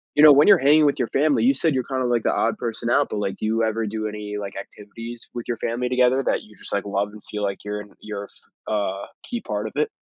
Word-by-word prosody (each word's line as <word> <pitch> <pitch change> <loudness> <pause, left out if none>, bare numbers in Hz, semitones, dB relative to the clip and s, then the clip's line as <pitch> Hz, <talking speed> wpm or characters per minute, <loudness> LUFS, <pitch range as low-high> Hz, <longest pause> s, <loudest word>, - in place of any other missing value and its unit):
you 150 - +5
know, 150 - +11
when 145 +2 +6
you're - - +8
hanging 150 +3 +5
with 140 - +2
your 115 - +1
family, 145 +1 +2
you 265 +3 +5
said 160 -3 +1
you're 130 -1 0
kinda, 130 -1 -2
like, 120 -2 +1
the - - +2
odd 115 - +1
person 115 0 -3
out, - - +3
but, 105 - -3
like, 100 -1 -2
do - - -4
you 115 +1 +1
ever 110 0 0
do 110 +1 -3
any, 105 -1 -5
like, 100 -1 -6
activities 115 +4 -9
with 120 -1 -6
your 120 - -2
family 125 +2 -2
together 125 +1 +3
that - - 0
you 105 -1 -17
just, - - -11
like, 100 0 -1
love 100 0 -1
and 105 0 -13
feel, 105 - -6
like, 100 -1 -3
you're 105 0 -4
in 105 - -14
you're 105 -1 -6
f 105 - -10
a 100 -2 -1 0.2
key 240 -1 -4
part 105 - -3
of - - -9
it? 150 - +2
115 Hz, 280 wpm, -23 LUFS, 105-130 Hz, 0.2 s, know